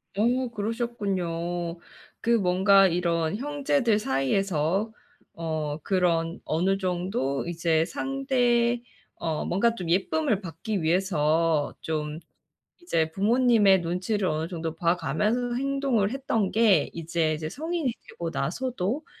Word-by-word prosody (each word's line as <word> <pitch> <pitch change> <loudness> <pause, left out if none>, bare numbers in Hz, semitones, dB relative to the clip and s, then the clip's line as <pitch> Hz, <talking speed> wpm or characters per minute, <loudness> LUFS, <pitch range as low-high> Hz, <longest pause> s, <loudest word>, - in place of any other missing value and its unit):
어 245 +5 +2
그러셨군요. 190 -7 -3 0.4
그 235 - 0
뭔가 195 -2 +5
이런 170 -1 0
형제들 275 -3 +1
사이에서 175 - 0 0.4
어 155 -3 -3
그런 170 -3 +1
어느 185 +5 +1
정도 180 - -1
이제 165 -1 +1
상대 245 -2 +1 0.3
어 160 -2 -3
뭔가 230 +6 +2
좀 180 -6 -5
예쁨을 210 - +1
받기 185 +3 -4
위해서 160 -3 +1
좀 155 0 -3 0.6
이제 160 - 0
부모님의 210 -1 +4
눈치를 185 +4 -1
어느 155 +1 -1
정도 165 -2 -4
봐 170 +1 +2
가면서 215 - 0
행동을 270 -5 +1
했던 230 -7 -1
게 210 -9 +4
이제 165 -1 -1
이제 155 0 -4
성인이 315 - -2 0.2
되고 170 -1 -5
나서도 240 - -2
190 Hz, 240 characters per minute, -26 LUFS, 165-235 Hz, 0.6 s, 뭔가